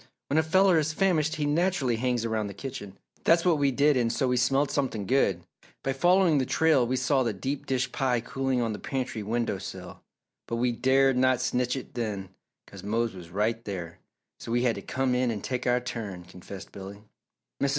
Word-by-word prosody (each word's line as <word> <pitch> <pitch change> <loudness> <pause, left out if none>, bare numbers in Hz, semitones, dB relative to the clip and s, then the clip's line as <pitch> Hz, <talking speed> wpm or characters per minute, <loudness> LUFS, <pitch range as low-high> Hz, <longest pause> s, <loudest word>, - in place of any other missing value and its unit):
When 155 - +4
a - - +5
feller 180 +2 +4
is 155 0 -1
famished 160 -3 +1
he 150 -2 -1
naturally 150 -5 +1
hangs 120 -1 0
around 110 -2 -1
the 100 - -8
kitchen. 105 -5 -7 0.3
That's 170 +1 +4
what 170 -4 +3
we 140 -1 +3
did 140 +3 +3
and 120 -2 +1
so 130 +2 0
we 125 - +2
smelled 135 +3 +2
something 125 -8 -1
good. 135 +6 +2 0.4
By 135 - 0
following 175 +1 +4
the 130 - +1
trail 155 -7 +3
we 130 - 0
saw 130 +2 +2
the 115 -4 0
deep 135 +8 -4
dish 130 -1 0
pie 125 -3 +1
cooling 130 +1 -1
on 115 -2 -1
the 105 - -6
pantry 130 -4 -3
window 115 -1 -1
sill 90 -1 -8 0.5
but 115 - -2
we 120 +1 +1
dared 130 +2 +3
not 130 -1 +3
snitch 125 0 0
it 135 - -7
then 105 -5 -3 0.4
'cause - - -12
Mose 115 +2 -1
was 90 -3 -10
right 110 +5 -1
there, 90 -5 -6 0.4
so - - -7
we 120 +1 +2
had 120 -2 +3
to - - -7
come 130 -1 -1
in 125 0 +1
and 110 -3 -3
take 125 -1 -3
our 125 0 +3
turn," 115 -7 -6
confessed 90 +2 -11
Billy. 100 +1 -9 0.6
Mrs. 140 - +2
125 Hz, 210 wpm, -27 LUFS, 110-135 Hz, 0.6 s, a